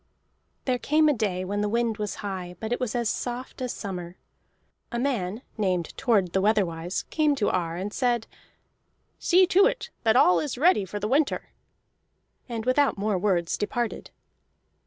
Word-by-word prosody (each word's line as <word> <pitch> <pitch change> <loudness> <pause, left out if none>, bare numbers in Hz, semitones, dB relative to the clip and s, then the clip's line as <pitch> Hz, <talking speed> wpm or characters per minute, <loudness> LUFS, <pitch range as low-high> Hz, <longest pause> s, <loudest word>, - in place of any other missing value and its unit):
There 250 -2 +1
came 310 +4 +3
a 300 - +4
day 195 -6 -1
when 205 +2 -2
the 210 - 0
wind 230 -1 0
was 210 -1 -3
high, 185 -3 -5
but 220 +1 -5
it - - -2
was 250 -2 -2
as 235 -2 0
soft 245 +3 -4
as 250 -1 -2
summer. 180 -3 -6 0.7
A 240 - -2
man 235 -4 -1 0.2
named 185 -5 0
Thord 210 -9 +1
the 190 - +2
Weatherwise 185 -4 0
came 305 -2 +2
to 215 -6 +1
Ar 170 -2 -1
and 195 +4 -4
said: 240 -3 +1 0.9
"See 370 +2 +5
to 375 +2 +5
it - - -3
that 220 0 +3
all 180 -8 +6
is 285 -5 -3
ready 310 - +4
for 205 +3 -5
the 210 - -2
winter!" 280 +5 +1 1.0
and 230 -2 -4
without 270 +1 +3
more 200 -1 0
words 175 -4 0
departed. 235 +2 -2
215 Hz, 170 wpm, -26 LUFS, 190-255 Hz, 1.0 s, all